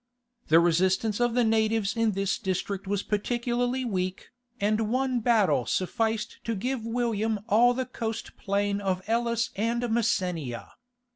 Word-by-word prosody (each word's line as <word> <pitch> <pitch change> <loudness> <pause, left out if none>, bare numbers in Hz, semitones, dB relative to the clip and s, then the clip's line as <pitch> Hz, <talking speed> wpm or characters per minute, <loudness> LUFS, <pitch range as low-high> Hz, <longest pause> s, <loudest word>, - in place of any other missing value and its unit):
The 160 +2 +6
resistance 190 +6 +2
of 240 -1 +2
the 245 - +4
natives 220 -2 +1
in 225 -2 +1
this 195 0 -1
district 190 +1 -3
was 200 0 -1
particularly 245 +4 -1
weak, 185 -4 -3 0.3
and 215 +1 +1
one 255 +1 +1
battle 205 - +2
sufficed 220 +4 -1
to 230 - -1
give 250 +4 -2
William 225 -2 -1
all 240 +4 +4
the 260 0 -1
coast 225 -3 -5
plain 200 0 -1
of 190 -2 -1
Elis 235 +1 0
and 230 +4 0
Messenia. 180 - -1
220 Hz, 140 wpm, -27 LUFS, 195-235 Hz, 0.3 s, The